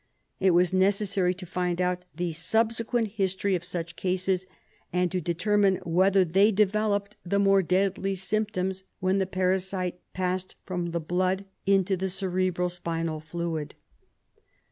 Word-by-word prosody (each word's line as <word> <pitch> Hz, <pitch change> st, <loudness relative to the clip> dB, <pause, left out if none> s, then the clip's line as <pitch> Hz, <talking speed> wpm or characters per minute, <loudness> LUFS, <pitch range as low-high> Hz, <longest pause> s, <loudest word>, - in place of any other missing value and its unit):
It 190 Hz, -2 st, +4 dB
was 180 Hz, 0 st, +3 dB
necessary 190 Hz, -1 st, +2 dB
to 180 Hz, 0 st, -8 dB
find 180 Hz, -1 st, -2 dB
out 180 Hz, 0 st, 0 dB
the 175 Hz, 0 st, -2 dB
subsequent 225 Hz, +6 st, +1 dB
history 195 Hz, -1 st, 0 dB
of 180 Hz, -2 st, -1 dB
such 170 Hz, -1 st, -5 dB
cases, 185 Hz, 0 st, -1 dB, 0.4 s
and 180 Hz, -1 st, +1 dB
to 185 Hz, -, -1 dB
determine 190 Hz, +4 st, +2 dB
whether 185 Hz, +3 st, +4 dB
they 195 Hz, +6 st, +4 dB
developed 210 Hz, 0 st, +1 dB
the 185 Hz, +3 st, 0 dB
more 195 Hz, -1 st, +5 dB
deadly 195 Hz, +2 st, 0 dB
symptoms 190 Hz, -1 st, -1 dB, 0.2 s
when 185 Hz, +1 st, +1 dB
the 190 Hz, -, 0 dB
parasite 185 Hz, -1 st, -1 dB, 0.2 s
passed 185 Hz, 0 st, -2 dB
from 180 Hz, -2 st, -2 dB
the 170 Hz, 0 st, -2 dB
blood 185 Hz, +4 st, 0 dB, 0.2 s
into 195 Hz, -1 st, +3 dB
the 190 Hz, +1 st, -2 dB
cerebro 185 Hz, -1 st, 0 dB
spinal 165 Hz, -2 st, -3 dB
fluid. 155 Hz, -1 st, -4 dB
185 Hz, 140 wpm, -27 LUFS, 180-195 Hz, 0.4 s, more